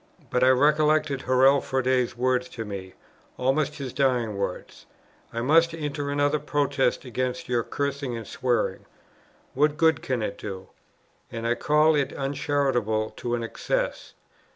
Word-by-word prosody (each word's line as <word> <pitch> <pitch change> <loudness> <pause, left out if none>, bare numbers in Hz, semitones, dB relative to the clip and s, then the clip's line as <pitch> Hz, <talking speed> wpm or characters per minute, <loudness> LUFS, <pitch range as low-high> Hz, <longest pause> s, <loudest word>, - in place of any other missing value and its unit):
But 125 - +2
I 130 - +6
recollected 150 +1 +3
Hurrell 135 +2 +4
Froude's 130 -2 0
words 125 0 +1
to 115 - -3
me, 95 -2 -7 0.4
almost 145 +3 0
his 135 -5 -6
dying 125 -6 +1
words, 100 -2 -5 0.4
"I 115 - -3
must 165 +5 +4
enter 145 -2 -3
another 145 +1 +1
protest 140 -3 0
against 125 0 -3
your 120 -1 +1
cursing 140 -1 -3
and 115 - -7
swearing. 120 +3 -1 0.7
What 150 +2 +2
good 160 0 +3
can 125 -4 -2
it 100 - -4
do? 95 -2 -7 0.6
and 115 0 -5
I 115 - +2
call 150 +4 +3
it 145 -2 0
uncharitable 135 -6 0
to 120 0 -2
an 120 - -3
excess. 115 - -3
130 Hz, 145 wpm, -25 LUFS, 120-145 Hz, 0.7 s, I